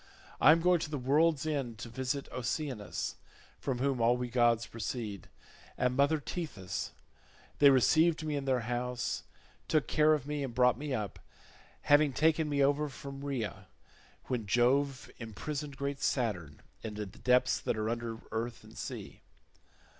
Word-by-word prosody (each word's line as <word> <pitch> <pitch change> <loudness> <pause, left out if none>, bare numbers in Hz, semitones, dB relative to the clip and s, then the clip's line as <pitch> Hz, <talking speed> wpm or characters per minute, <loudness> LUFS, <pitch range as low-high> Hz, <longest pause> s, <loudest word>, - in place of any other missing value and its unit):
I 150 - +9
am 165 +1 +4
going 180 0 +4
to 155 - -4
the 150 - -2
world's 150 +4 +2
end 135 -7 -2
to 110 - -7
visit 130 +3 -3
Oceanus 125 -3 -3 0.4
(from 130 -3 -2
whom 130 -1 0
all 120 +2 +4
we 125 -1 -4
gods 120 -1 +3
proceed) 110 -3 -5 0.5
and 125 0 +1
mother 140 +3 +3
Tethys: 145 - -4 0.7
they 145 - +8
received 155 +5 +4
me 150 -1 -1
in 140 -1 -2
their 130 -2 +1
house, 125 +1 -2 0.5
took 155 -6 +2
care 155 0 +4
of 140 -3 -5
me, 145 0 -2
and 125 -4 -5
brought 125 +1 +4
me 150 0 -4
up, 105 -6 -3 0.6
having 145 -1 +4
taken 155 +1 +2
me 140 -1 +2
over 145 +2 +2
from 135 +1 -8
Rhaea 110 -9 -4 0.6
when 115 -5 -2
Jove 135 +5 +2
imprisoned 140 +6 -5
great 140 -1 -3
Saturn 90 - -1 0.2
in 110 -2 -6
the 105 0 -3
depths 125 +6 +2
that - - -2
are 110 0 -1
under 115 0 -3
earth 115 +1 -3
and - - -15
sea. - - -7
130 Hz, 160 wpm, -32 LUFS, 115-145 Hz, 0.7 s, I